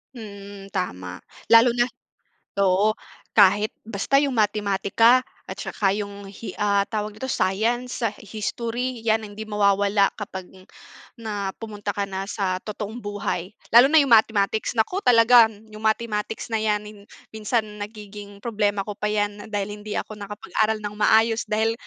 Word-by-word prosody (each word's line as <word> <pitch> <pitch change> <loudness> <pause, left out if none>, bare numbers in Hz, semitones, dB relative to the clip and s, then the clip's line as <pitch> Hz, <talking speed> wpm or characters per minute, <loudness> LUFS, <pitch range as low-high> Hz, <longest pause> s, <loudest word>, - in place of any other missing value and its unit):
Mm, 200 -2 -10
tama. 90 - -4 0.3
Lalo 230 +2 +8
na 240 - +4 0.8
oo. 195 +3 +3 0.4
Kahit 205 +1 +5 0.2
basta 225 +6 +1
yung 280 -3 +1
matematika 210 +3 +3 0.2
at - - -6
saka 195 -1 0
yung 200 -1 -6
hi 200 +3 -8
ah, 200 -1 +2
tawag 210 -1 -3
nito, 260 +4 -5
science, 235 +7 -1 0.2
history, 235 +4 -4
'yan 220 -1 +2
ang 205 -1 -9
hindi 215 +1 -7
mawawala 200 -1 +2
kapag 190 -3 -6 0.7
na 205 -4 -3
pumunta 210 -2 -6
ka 200 -1 -1
na 190 0 -4
sa 185 -3 -1
totoong 215 +1 -6
buhay. 205 -3 -3 0.2
Lalo 245 +3 +8
na 320 - +5
yung 275 - 0
mathematics, 215 -1 +3
naku, 365 - +1
talaga 230 - +6
yung 215 0 -14
mathematics 220 0 -1
na 225 - +3
'yan 210 -1 0 0.5
minsan 220 +1 0 0.2
nagiging 205 -1 -9
problema 205 -3 0
ko 210 - -5
pa 210 - -1
'yan 205 0 -2
dahil 205 -1 -2
hindi 210 0 -6
ako 215 - -4
nakapag-aral 210 +1 -1
nang 205 0 -5
maayos. 225 +1 +3
Dahil 220 +1 +1
210 Hz, 145 wpm, -23 LUFS, 200-225 Hz, 0.8 s, Lalo